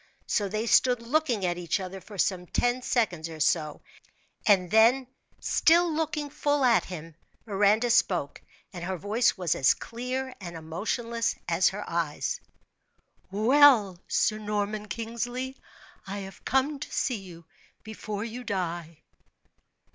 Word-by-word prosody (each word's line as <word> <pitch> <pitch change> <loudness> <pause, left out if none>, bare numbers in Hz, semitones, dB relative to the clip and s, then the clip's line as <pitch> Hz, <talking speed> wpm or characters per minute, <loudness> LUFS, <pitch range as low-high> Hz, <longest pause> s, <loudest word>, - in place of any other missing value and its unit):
So 205 -2 0
they 215 +3 -2
stood 245 +1 +4
looking 245 -5 0
at 175 0 -1
each 175 +3 -1
other 190 0 -7
for 205 +3 -12
some 180 -1 0
ten 245 +6 0
seconds 180 -11 0
or 160 -1 -9
so, 155 -1 +1 0.7
and 185 -4 +4
then, 235 +4 +5 0.3
still 340 0 +3
looking 300 -2 -2
full 290 -2 +1
at 235 -2 +4
him, 165 -3 -8 0.3
Miranda 210 +3 +3
spoke, 175 -10 +1 0.3
and 175 -2 -7
her 185 +1 -3
voice 215 +6 +1
was 180 -3 +1
as 130 - +3
clear 255 +2 -4
and 170 -2 -7
emotionless 225 +9 -2
as 170 +1 +3
her 205 +2 -6
eyes, 165 -3 -2 0.9
"Well, 220 -2 +5
Sir 215 -1 +1
Norman 210 0 -2
Kingsley, 240 +4 -4 0.5
I 195 +1 -4
have 190 -1 -13
come 275 +2 +1
to - - -7
see 250 -4 0
you 170 -3 -12 0.4
before 215 -1 -5
you 235 +2 -6
die." 175 -6 -4
210 Hz, 140 wpm, -27 LUFS, 180-245 Hz, 0.9 s, then